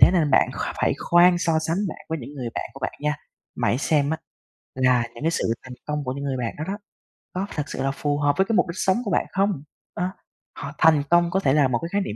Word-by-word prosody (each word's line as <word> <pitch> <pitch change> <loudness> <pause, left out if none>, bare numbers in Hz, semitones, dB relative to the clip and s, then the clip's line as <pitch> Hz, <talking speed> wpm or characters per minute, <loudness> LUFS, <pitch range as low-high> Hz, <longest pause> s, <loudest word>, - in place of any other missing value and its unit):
thế - - +9
nên 160 -5 +3
bạn - - +4
kh - - -4
phải - - +3
khoan 175 +1 +5
so 165 -2 +2
sánh 160 +1 -1 0.3
với 160 0 -2
những 140 +2 -9
người 125 -4 -4
bạn - - -4
của 135 - -10
bạn - - -2
nha. 150 0 0 0.4
Mà - - +1
hãy 120 - +2
xem 145 0 +2
á, 160 - 0 0.6
là 125 -2 +3
những 120 - -8
cái 165 - +3
sự 115 -8 0
thành 130 -1 -8
công 150 -1 -2
của 130 - -2
những 140 +1 -5
người 135 -2 -1
bạn 120 -2 -3
đó 155 - -2
đó, 200 +1 -3 0.6
có 185 +2 -1
thật 150 - 0
sự 130 - -3
là 135 - +1
phù 145 +1 -1
hợp 145 0 +2
với 190 - +4
cái 225 - 0
mục 180 - +3
đích 170 - -5
sống 190 +3 +2
của 200 - -2
bạn - - +2
không? 195 -7 0 0.3
Đó. 180 +2 -1 0.5
Họ 140 0 -5
thành 155 -3 +5
công 175 0 +4
có 190 - +2
thể 135 -9 +2
là 145 -2 +4
một 120 -2 0
cái 165 - -4
khái 200 - +1
niệm 105 - -4
150 Hz, 275 wpm, -24 LUFS, 135-175 Hz, 0.6 s, thế